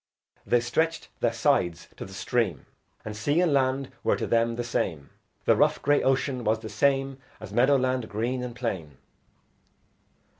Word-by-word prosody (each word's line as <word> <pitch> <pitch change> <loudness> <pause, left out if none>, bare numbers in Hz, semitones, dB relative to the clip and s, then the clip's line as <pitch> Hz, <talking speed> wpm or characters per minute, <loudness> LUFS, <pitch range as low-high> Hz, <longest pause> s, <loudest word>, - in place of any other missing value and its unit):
They 120 - +3
stretched 160 +7 -1
their - - +2
sides 115 - +1
to - - -6
the 95 - -11
stream, 105 -3 -1 0.4
And 105 -1 -5
sea 145 +9 +1
and 175 -4 +3
land 135 0 +1
were - - +3
to - - -3
them 115 0 +1
the 120 - -2
same, 80 -11 -2 0.3
The - - +5
rough - - +3
grey 145 0 +3
ocean 130 -1 0
was 110 0 +2
the 110 0 -8
same 135 +4 +1 0.2
As 105 -2 -9
meadow 130 +5 +4
land 130 -2 -1
green 120 +4 -2
and 125 -1 -5
plain. 95 - -4
120 Hz, 165 wpm, -27 LUFS, 110-135 Hz, 0.4 s, The